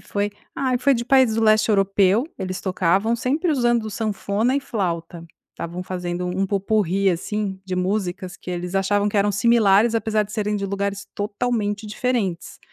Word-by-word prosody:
foi? 205 0 -2 0.3
Ah, 260 -2 +1
foi 270 +2 +3
de 235 -1 -2
países 260 -3 +4
do 225 - +1
Leste 215 0 +4
Europeu, 200 +3 +3
eles 185 -1 -4
tocavam. 190 +4 +1
Sempre 295 +9 0
usando 240 -5 +1
sanfona 215 +2 -1
e 280 - 0
flauta, 170 -8 -3 0.3
estavam 175 +2 -6
fazendo 180 -1 -4
um 185 +2 -1
pot-pourri, 195 -1 +1
assim, 190 +2 -3
de 185 -1 -3
músicas 185 -1 -2
que - - -13
eles 180 +1 -4
achavam 205 +2 +2
que 210 - -3
eram 205 +1 +3
similares, 220 +1 +4
apesar 220 -1 +1
de 210 - -12
serem 210 -1 -1
de 200 -1 -3
lugares 200 0 -3
totalmente 205 0 -2
diferentes. 210 -6 -2
205 Hz, 165 wpm, -22 LUFS, 190-225 Hz, 0.3 s, países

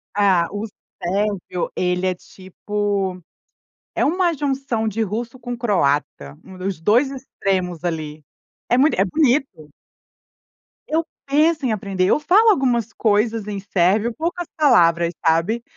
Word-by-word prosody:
Ah, 190 -4 +3
o 205 +2 -4 0.3
Sérvio, 195 -1 -2
ele 180 0 0
é 185 - +1
tipo, 190 +1 -4 0.8
é - - +1
uma 350 +2 +2
junção 270 -5 -2
de 220 +2 -2
russo 230 +4 -4
com 245 0 -5
o - - -6
croata, 145 - -1
um 190 -1 -12
dos 190 -2 -3
dois 230 - +3
extremos 190 - -3
ali 155 -3 -4 0.5
é 245 - +3
muito 275 +1 +4
é - - +5
bonito. 250 - 0 1.1
Eu 320 +1 0 0.2
penso 300 +1 +2
em 245 - +1
aprender. 195 -3 -1
Eu - - +3
falo 405 +9 +4
algumas 245 - +1
coisas 220 0 +1
em 205 -1 -4
sérvio, 200 +4 +1
poucas 340 +6 -3
palavras, 170 - +4
sabe, 170 +9 +2
210 Hz, 135 wpm, -21 LUFS, 180-260 Hz, 1.1 s, é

